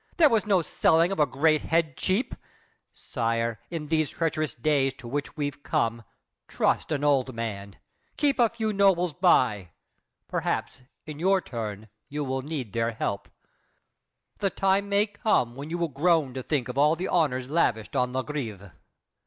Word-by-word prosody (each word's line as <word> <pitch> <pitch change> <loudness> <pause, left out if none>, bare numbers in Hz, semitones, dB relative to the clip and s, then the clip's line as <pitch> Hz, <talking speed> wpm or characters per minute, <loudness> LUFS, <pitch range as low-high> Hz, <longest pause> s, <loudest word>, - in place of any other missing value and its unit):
There 320 -4 +7
was 220 -2 +2
no 190 -4 +3
selling 165 +3 +3
of 195 - -3
a 150 - +4
great 155 +2 +2
head 160 -4 0
cheap! 195 +8 0 0.6
Sire, 115 -2 -2
in 160 -3 -4
these 155 -1 +1
treacherous 155 -4 -2
days 135 +1 +1
to 120 - -11
which 145 +5 -4
we've 145 -1 -3
come, 115 -3 -1 0.5
Trust - - 0
an 145 -2 -1
old 135 -4 +2
man, 100 -3 -5 0.4
keep 285 -3 +1
a 235 -2 +5
few 220 -2 -2
nobles 190 -4 +3
by. 125 - +2 0.6
Perhaps, 130 - -2 0.2
in 150 -1 -8
your 190 +3 +3
turn, 110 - -6 0.2
you 145 +1 -3
will 135 -1 -2
need 135 -7 -5
their 115 0 0
help. 100 -2 -3 1.1
The 200 - +1
time 195 +1 +1
may 200 +1 +3
come 205 - 0
when 140 +3 -7
you 170 - -2
will 170 -1 0
groan 155 -1 +1
to 130 - -4
think 130 -2 -1
Of 125 +2 -3
all 150 +3 +5
the 180 +3 -3
honors 130 -7 +1
lavished 125 -8 0
on 125 0 +1
La 130 +1 -1
Grève! 110 -11 -5
145 Hz, 170 wpm, -26 LUFS, 125-175 Hz, 1.1 s, There